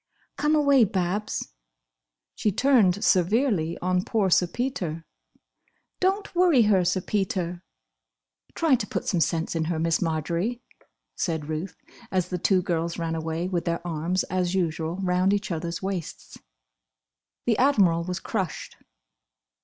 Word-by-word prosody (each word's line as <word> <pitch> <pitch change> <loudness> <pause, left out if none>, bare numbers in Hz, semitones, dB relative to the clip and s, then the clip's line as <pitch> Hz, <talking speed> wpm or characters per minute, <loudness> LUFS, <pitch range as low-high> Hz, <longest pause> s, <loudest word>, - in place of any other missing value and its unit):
"Come 300 +1 +2
away, 280 -4 +5
Babs!" 200 0 -2 0.8
She 210 - 0
turned 205 -5 +3
severely 185 - +2
on 180 0 +1
poor 200 -4 0
Sir 180 - +4
Peter, 175 - -3 0.9
"Don't 390 +2 0
worry 345 -9 +5
her, 200 -4 +3
Sir 185 +1 +1
Peter!" 180 -3 -2 0.9
"Try 325 -4 +2
to 225 -5 +1
put - - -3
some 180 - +1
sense 165 0 0
in 160 -1 0
her, 165 0 -1
Miss 165 0 +1
Marjory," 170 - -1 0.5
said 160 -5 -2
Ruth, 160 +4 -4 0.4
as 185 -2 0
the 180 - -3
two 185 +1 +2
girls 170 -1 -2
ran 165 -1 -2
away, 160 +2 -2
with 180 -2 -2
their 170 0 -2
arms, 170 +2 -1
as 185 0 -1
usual, 165 -2 -1
round 185 +2 +2
each 205 0 -2
others' 170 +1 -4
waists. 170 - -5 1.1
The 230 -3 +1
Admiral 195 -12 +4
was 180 +1 -4
crushed. 190 -7 -4
180 Hz, 140 wpm, -25 LUFS, 170-210 Hz, 1.1 s, away